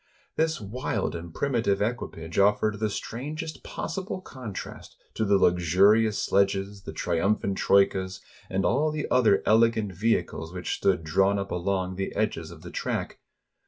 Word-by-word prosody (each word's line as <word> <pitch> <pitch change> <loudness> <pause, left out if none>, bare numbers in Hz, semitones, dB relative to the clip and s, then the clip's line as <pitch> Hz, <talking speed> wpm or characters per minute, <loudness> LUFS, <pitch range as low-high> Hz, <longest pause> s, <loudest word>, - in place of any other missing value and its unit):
This 160 -1 +1
wild 105 -1 -3
and 85 0 -7
primitive 115 - 0
equipage 100 -7 -3
offered 105 +1 +3
the 110 -1 0
strangest 150 +9 -5
possible 185 +3 -4
contrast 125 - -8 0.2
to - - -1
the 100 -1 +4
luxurious 95 +5 +4
sledges, 100 0 +1
the - - -5
trium 85 +6 +1
phant 100 -2 -3
troikas, 95 -1 +2 0.3
and 95 +1 0
all 140 +7 +2
the 150 -1 -3
other 105 -6 +4
elegant 110 -2 +3
vehicles 95 -4 -1
which 90 -1 -3
stood 95 -4 +1
drawn 95 +5 +2
up 100 0 -4
along 95 +1 -1
the 95 - -3
edges - - -1
of - - -12
the - - -8
track. - - -3
100 Hz, 150 wpm, -27 LUFS, 95-115 Hz, 0.3 s, the